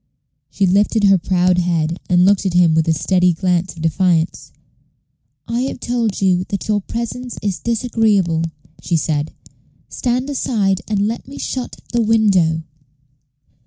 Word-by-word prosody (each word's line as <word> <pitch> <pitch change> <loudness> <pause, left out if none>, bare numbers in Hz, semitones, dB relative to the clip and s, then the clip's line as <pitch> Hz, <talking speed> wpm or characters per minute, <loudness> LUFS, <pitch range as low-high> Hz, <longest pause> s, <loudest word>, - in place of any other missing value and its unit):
She 200 - 0
lifted 205 +3 +2
her 195 -2 +5
proud 180 0 +2
head, 170 -1 -1
and 180 0 +4
looked 200 0 +3
at 180 - -2
him 175 -2 +5
with 160 0 +1
a - - +3
steady 180 +3 +2
glance 180 +1 -1
of 165 - -8
defiance. 165 0 0 1.0
"I 235 +1 -1
have - - -7
told 235 -4 -1
you 185 -2 +2
that 200 - -4
your 210 -1 +1
presence 235 +3 -5
is 200 -3 -2
disagreeable," 215 -8 +1 0.4
she 170 - 0
said. 150 -1 -1 0.6
"Stand 250 +1 -1
aside, 210 -8 0
and 205 -2 0
let 230 +3 -5
me 275 - -10
shut 255 -2 -4 0.2
the 235 - +2
window." 195 -8 +2
190 Hz, 150 wpm, -18 LUFS, 175-225 Hz, 1.0 s, her